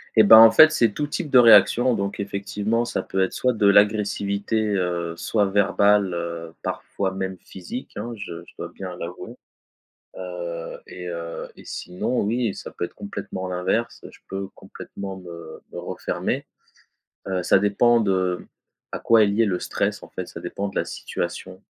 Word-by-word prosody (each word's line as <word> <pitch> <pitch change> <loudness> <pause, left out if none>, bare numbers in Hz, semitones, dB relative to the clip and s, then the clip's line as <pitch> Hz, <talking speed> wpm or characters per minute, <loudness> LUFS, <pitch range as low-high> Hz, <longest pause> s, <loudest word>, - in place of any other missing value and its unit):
Et 110 - +7
ben, 110 +2 +9
en 115 0 +10
fait, 155 +7 +8
c'est 115 -8 +2
tout 145 -1 -2
type 150 +1 -4
de 130 - +5
réaction, 120 +2 +6
donc 100 0 -3
effectivement, 100 +3 -2
ça 120 - -2
peut 95 - -2
être 95 - 0
soit 125 -1 +1
de 105 -2 +2
l'agressivité, 100 +1 +2 0.2
heu, 85 -3 -2
soit 105 -3 +1
verbale, 100 0 +3
heu, 85 -1 -5
parfois 95 -1 -3
même 95 -1 -4
physique, 95 +8 -8
hein. 120 - -5
Je 85 -5 -8
je - - -18
dois - - -6
bien 95 -2 -8
l'avouer, 85 0 -8 0.8
heu 85 -2 -6
et 90 0 -8
heu 85 -1 -6
et - - -14
sinon, 90 +8 -3
oui, 115 0 0
ça - - -8
peut 85 - -3
être - - -14
complètement 100 -2 -6
l'inverse, 90 +6 -2
je - - -18
peux 95 0 -5
complètement 95 -1 -9
me 85 -3 -10
me - - -8
refermer, - - -3 0.8
heu, 95 -1 -1
ça 95 - +5
dépend 115 +4 +3
de 95 -4 0 0.5
à - - -4
quoi 115 -2 +5
est - - +3
lié 105 +3 +2
le 90 -3 -1
stress - - -2
en - - -12
fait. - - -6
Ça - - -9
dépend 100 - -4
de 100 - -9
la - - 0
situation, - - -5
100 Hz, 175 wpm, -23 LUFS, 90-110 Hz, 0.8 s, en